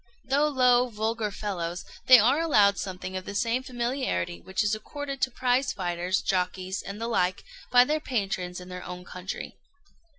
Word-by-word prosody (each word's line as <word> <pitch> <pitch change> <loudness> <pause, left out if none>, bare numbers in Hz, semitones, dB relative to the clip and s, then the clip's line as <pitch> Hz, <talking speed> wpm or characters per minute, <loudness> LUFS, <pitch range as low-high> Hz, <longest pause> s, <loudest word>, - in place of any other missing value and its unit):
Though 280 +4 +2
low, 250 -3 +4
vulgar 220 0 -2
fellows, 180 -4 -4 0.2
they 255 - +11
are 245 +7 +4
allowed 210 -12 +4
something 185 0 -5
of 185 0 -4
the 205 - -6
same 230 +4 +1
familiarity 240 - -2
which 190 +2 -1
is 205 0 +1
accorded 275 +5 -5
to - - +2
prize 255 +2 +1
fighters, 180 0 -1
jockeys, 185 0 -1
and 200 +2 -7
the 230 - -2
like, 185 -5 0 0.3
by 245 0 +7
their 305 +4 0
patrons 195 -9 -2
in 180 0 -11
our 180 0 -6
own 180 0 -8
country. 180 +2 -7
210 Hz, 170 wpm, -27 LUFS, 185-250 Hz, 0.3 s, they